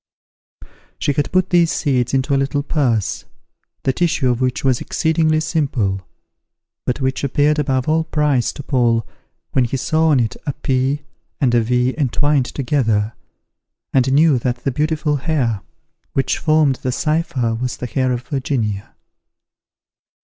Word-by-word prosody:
She 145 - 0
had 145 +1 -1
put 185 0 +1
these 170 -2 +4
seeds 125 -5 0
into 135 +1 +1
a - - +4
little 135 +1 0
purse, 125 - 0 0.6
the 130 - +1
tissue 155 -5 +1
of 120 +1 -2
which 125 -1 0
was 130 -3 +2
exceedingly 160 -1 +1
simple; 130 - -1 0.9
but 125 +3 -1
which 130 +1 -1
appeared 145 +2 +2
above 130 -3 0
all 160 +1 +2
price 150 -6 +1
to 145 - -8
Paul, 120 -4 +1 0.5
when 130 -2 +2
he 125 +3 -2
saw 160 +5 +1
on 145 -4 +4
it 115 -3 0
a 145 - 0
P 135 +3 -1 0.4
and 125 -4 +2
a 120 - +4
V 125 +2 +1
entwined 145 -1 +1
together, 115 -6 0 0.8
and 130 0 +3
knew 145 -1 +4
that 120 0 -2
the 135 - 0
beautiful 150 +1 0
hair 130 - -1 0.5
which 135 -1 0
formed 155 -4 +3
the 130 - -2
cypher 145 -5 0
was 125 +2 -3
the - - -5
hair 130 +2 0
of 125 0 -2
Virginia. 125 -7 -3
135 Hz, 150 wpm, -19 LUFS, 125-150 Hz, 0.9 s, these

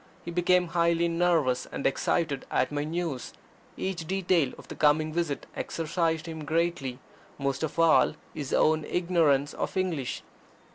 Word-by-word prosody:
He 170 - -4
became 180 0 +2
highly 170 0 +2
nervous 165 -7 +1
and - - -6
excited 140 +1 0
at - - +1
my 145 0 -1
news. 160 -4 -3 0.4
Each 175 -4 -3
detail 180 -6 +1
of - - -13
the - - -7
coming 155 +1 +2
visit 165 -4 -2
exercised 165 -1 -1
him 160 -2 -6
greatly 155 -5 -1 0.4
most 140 -1 -2
of 160 0 -3
all 165 -2 +5 0.2
his 140 -3 -5
own 155 0 +3
ignorance 160 -5 +2
of - - -3
English. 170 -9 -2
165 Hz, 145 wpm, -28 LUFS, 145-170 Hz, 0.4 s, all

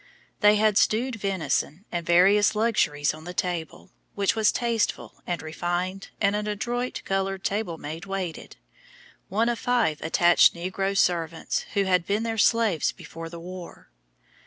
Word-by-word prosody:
They 210 0 +6
had 210 -1 +3
stewed 235 +3 +1
venison 190 -2 -2
and 175 -1 -2
various 195 +5 +4
luxuries 165 -11 +1
on 155 +1 -11
the 180 0 -7
table, 175 0 -4 0.2
which 200 +1 +1
was 220 -1 +3
tasteful 235 -2 -2
and 175 -2 -3
refined, 175 +4 -3
and 200 0 +2
an 210 0 -2
adroit, 240 +4 -3
colored 195 0 -1
table 200 -5 -2
maid 160 +5 -7
waited, 190 -4 -5 0.7
one 220 +5 +1
of 240 -1 -1
five 235 -11 +1
attached 175 +2 +4
Negro 195 +3 -2
servants 165 -3 0
who 200 - +3
had 180 -2 +1
been 205 +2 0
their 225 -1 -2
slaves 220 -7 +3
before 165 0 -9
the 170 0 -9
war. 180 +1 -10
195 Hz, 150 wpm, -25 LUFS, 170-210 Hz, 0.7 s, They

